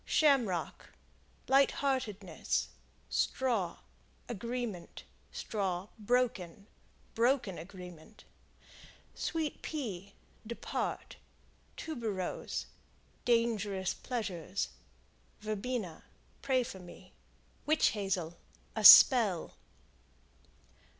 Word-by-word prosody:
Shamrock 245 - +1 0.5
Lightheartedness. 260 - +1 0.4
Straw 225 -10 0 0.5
Agreement. 235 -4 -5 0.3
Straw, 195 -2 -3
Broken 210 -5 0 0.5
Broken 235 -5 +1
agreement. 180 +2 -11 0.9
Sweet 320 -3 -3
Pea 200 - -5 0.3
Depart. 235 - -4 0.6
Tuberose 225 - -4 0.6
Dangerous 215 -6 +1
pleasures. 195 -6 -3 0.7
Verbena 215 -3 -4 0.4
Pray 260 -2 +2
for 195 -5 -8
me. 175 -1 -14 0.5
Witch 310 +1 +4
Hazel 185 -5 -3 0.4
A - - -2
spell. 220 - +9
215 Hz, 65 wpm, -32 LUFS, 185-250 Hz, 0.9 s, spell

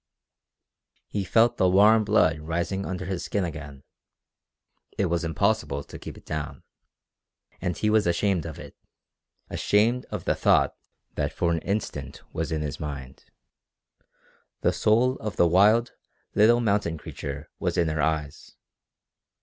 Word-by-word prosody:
He 100 - -2
felt 115 +5 +3
the 95 - +3
warm 105 +4 +6
blood 90 -7 +3
rising 85 +5 -2
under 95 0 -4
his 95 -2 -3
skin 100 - -1
again. 75 -4 -8 1.1
It 100 - +2
was 85 0 0
impossible 80 -3 0
to - - -11
keep - - -9
it - - -15
down. 75 -2 -5 1.0
And 90 -2 -2
he 105 - 0
was 110 -2 +3
ashamed 85 -1 +1
of 80 - -8
it - - -11 0.8
ashamed 115 +5 +2
of - - -5
the - - +2
thought - - +3 0.4
that - - -1
for 85 - 0
an 85 - 0
instant 75 -9 -4
was 80 0 -3
in 80 -1 -1
his 75 0 -5
mind. 70 -4 -7 1.4
The - - +2
soul 125 +5 +2
of 105 -2 -5
the - - +4
wild, 105 +7 +4 0.4
little 120 +3 +5
mountain 100 -7 0
creature 70 0 -7
was - - -1
in 85 - +3
her 80 -1 -1
eyes. 75 -2 -2
90 Hz, 145 wpm, -26 LUFS, 80-105 Hz, 1.4 s, warm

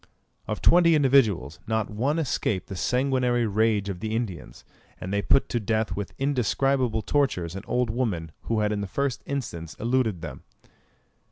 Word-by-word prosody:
Of 105 -1 -4
twenty 170 -1 +6
individuals, 115 - +3
not 110 -1 -1
one 130 +9 0
escaped 120 - -1
the 95 - -5
sanguinary 125 +2 +1
rage 105 -1 +1
of 95 -3 -4
the 110 +2 -3
Indians; 105 -9 -5 0.3
and 95 +2 -5
they 100 - +1
put 135 - +3
to 120 - 0
death 110 0 -1
with 100 -6 -5
indescribable 130 -3 +1
tortures 95 - 0
an 95 - -5
old 125 -2 0
woman 100 -10 -2
who 110 -2 0
had 105 0 +1
in 105 -1 -1
the 100 - -3
first 140 +5 -2
instance 85 - -4
eluded 115 -7 0
them. 70 -4 -7
110 Hz, 165 wpm, -26 LUFS, 100-130 Hz, 0.3 s, twenty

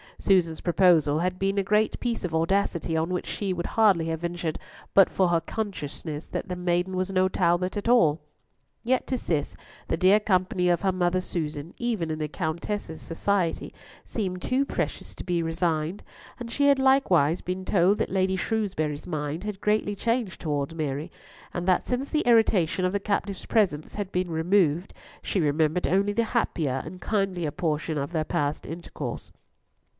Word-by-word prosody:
Susan's 175 -5 +2
proposal 165 -4 +4
had 180 +1 -1
been 195 +1 0
a 200 - +2
great 210 +2 +1
piece 235 -2 -2
of 175 -3 -3
audacity, 165 0 +1
on 160 +2 0
which 180 -1 -2
she 195 -3 -2
would 175 -1 -4
hardly 200 -7 +3
have 160 -1 -2
ventured 170 -2 -3 0.4
but 195 -2 +7
for 185 -2 +2
her 170 -1 +3
consciousness 160 -6 -5
that - - -4
the 180 - -3
maiden 180 +1 0
was 185 +1 -1
no 185 0 +3
Talbot 180 0 +1
at 205 +3 -2
all. 165 -11 +5 0.6
Yet 255 +2 +1
to 255 - 0
Cis 155 -10 -2 0.3
the - - 0
dear 190 +4 +5
company 185 -3 +1
of 175 - +2
her 195 -1 +2
mother 180 0 +1
Susan, 155 -2 -4
even 220 -10 -1
in 155 - -2
the 155 - -1
Countess's 160 +2 -4
society, 175 +1 -1 0.3
seemed 185 -5 -3
too 260 +2 +2
precious - - -3
to - - -7
be 175 -2 0
resigned, 165 +2 -1 0.4
and 235 -1 -6
she 285 +3 +2
had 280 -1 +5
likewise 190 - +3
been 185 +1 -4
told 190 +2 +3
that - - 0
Lady 190 0 +1
Shrewsbury's 180 -8 -2
mind 155 0 -3
had 210 -2 -5
greatly 210 -1 +1
changed 230 -1 -1
towards 145 -1 -2
Mary, 150 +1 -3 0.4
and 175 0 -3
that 185 - +2
since 260 +3 -2
the 305 - +1
irritation 200 -7 +3
of 185 - 0
the 200 - +1
captive's 200 -1 -2
presence 180 -9 +1
had 205 -2 -4
been 180 0 -1
removed, 170 0 +2 0.3
she 195 - -1
remembered 155 +2 +1
only 200 +3 +2
the 230 +2 +2
happier 155 - -1
and 180 +3 -9
kindlier 190 -7 -1
portion 155 -2 -2
of 140 +3 -3
their 160 -3 0
past 145 0 -2
intercourse. 170 +1 -6
180 Hz, 175 wpm, -26 LUFS, 160-200 Hz, 0.6 s, but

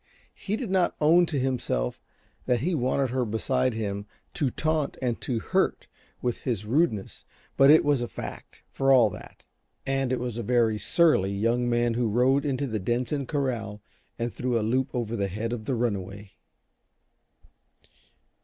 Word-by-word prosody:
He 205 - -3
did 220 -4 -4
not 185 -2 +2
own 165 +3 +5
to 155 - -2
himself 125 - -1 0.5
that 125 -3 +2
he 175 +6 0
wanted 130 -2 0
her 130 0 0
beside 125 +2 0
him 100 -2 -3 0.3
to 145 -6 0
taunt 155 +2 -1
and 125 -3 -2
to 125 - -2
hurt - - 0 0.4
with 125 -1 0
his 110 -5 -3
rudeness, 120 - 0 0.3
but 135 +1 +6
it 155 0 +7
was 145 -3 +2
a 120 - -2
fact, - - -9
for 135 0 +2
all 120 -6 +6
that. - - -12 0.4
And 135 -1 0
it 130 - 0
was 120 -1 -4
a - - -1
very 115 -2 +2
surly 150 - +3
young 115 +5 0
man 120 0 +1
who 120 0 0
rode 130 +6 +2
into 140 0 -1
the 110 -5 -2
Denson 125 +6 -1
corral 120 -8 -2 0.4
and 115 0 -3
threw 125 -1 -1
a 105 - -1
loop 130 +4 +1
over 115 -2 -2
the 100 -2 -1
head 110 +5 -3
of 110 -3 -5
the 130 - -1
runaway. 100 -4 -3
125 Hz, 170 wpm, -26 LUFS, 110-135 Hz, 0.5 s, it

